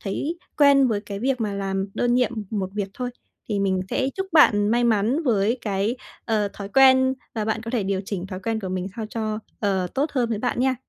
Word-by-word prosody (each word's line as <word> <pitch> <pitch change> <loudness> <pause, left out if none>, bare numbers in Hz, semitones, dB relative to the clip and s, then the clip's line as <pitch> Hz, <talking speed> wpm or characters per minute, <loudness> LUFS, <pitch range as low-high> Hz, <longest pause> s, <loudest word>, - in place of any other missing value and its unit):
thấy 290 - -3 0.2
quen 280 -2 +6
với 210 -3 0
cái 200 -1 -7
việc 255 +2 0
mà 210 -3 -1
làm 195 0 -2
đơn 245 0 +1
nhiệm 250 -1 +2 0.2
một 195 -3 -2
việc 205 -2 -2
thôi. 250 -1 -3 0.4
Thì 205 -2 0
mình 190 -1 +1
sẽ 265 0 0
chúc 385 0 -2
bạn 205 -10 +5
may 240 +2 +2
mắn 230 +7 +2
với 230 -1 +1
cái, 205 +3 -1 0.3
ờ, 215 -3 +1
thói 200 0 -7
quen 260 +2 +5 0.2
và 215 -2 -1
bạn 220 +1 -1
có 230 - -5
thể 240 -5 0
điều 195 0 -1
chỉnh 190 -2 -4
thói 185 -1 -6
quen 220 +3 -2
của 190 - -4
mình 185 0 -3
sao 220 -2 -4
cho, 215 -2 -2 0.2
ờ, 190 -3 +1
tốt 290 +3 0
hơn 245 -3 +1
với 225 -2 -1
bạn 245 +2 -1
nha. 260 0 +2
220 Hz, 230 wpm, -24 LUFS, 200-250 Hz, 0.4 s, quen